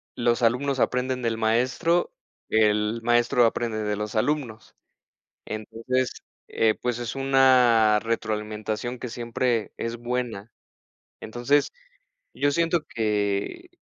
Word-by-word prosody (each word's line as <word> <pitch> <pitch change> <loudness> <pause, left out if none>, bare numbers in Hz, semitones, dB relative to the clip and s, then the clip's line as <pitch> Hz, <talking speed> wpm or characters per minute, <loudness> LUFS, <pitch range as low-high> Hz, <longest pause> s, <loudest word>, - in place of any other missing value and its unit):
los 120 0 +1
alumnos 130 +4 +1
aprenden 125 +1 0
del 115 -2 -1
maestro, 125 +10 +1 0.4
el 105 +1 +2
maestro 120 +1 +3
aprende 115 -1 -1
de 105 0 -1
los 105 +2 -5
alumnos. 120 -2 -2 0.7
Entonces, 115 +4 -2 0.4
eh, 110 -1 +2
pues, 120 -1 -2
es 120 -1 -4
una 130 -5 +4
retroalimentación 110 +1 -3
que 125 - -5
siempre 120 0 -2
es 115 0 -4
buena. 120 -3 -4 0.7
Entonces, 120 +6 +1 0.7
yo 145 - +1
siento 165 +2 +1
que 105 - -2
120 Hz, 110 wpm, -25 LUFS, 110-125 Hz, 0.7 s, una